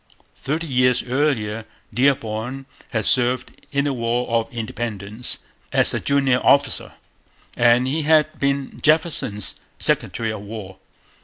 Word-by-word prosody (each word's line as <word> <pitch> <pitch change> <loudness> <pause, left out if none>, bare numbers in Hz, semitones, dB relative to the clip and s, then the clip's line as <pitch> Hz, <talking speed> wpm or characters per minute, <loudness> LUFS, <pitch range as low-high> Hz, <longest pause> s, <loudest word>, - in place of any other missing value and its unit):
Thirty 155 +5 -3
years 125 -3 +2
earlier 120 -5 0 0.3
Dearborn 125 0 0 0.2
had 110 -4 -1
served 125 0 +2 0.2
in 140 0 +1
the 145 - 0
War 120 0 -1
of 115 +2 0
Independence 110 -1 -4 0.3
as - - +3
a - - 0
junior 135 -3 +2
officer; 140 0 +3 0.6
and 120 +1 +4
he 145 +5 0
had 155 0 +3
been 140 -1 -1
Jefferson's 155 - +2 0.2
Secretary 110 -1 0
of 110 -2 -6
War. 100 -3 -8
125 Hz, 125 wpm, -22 LUFS, 110-140 Hz, 0.6 s, and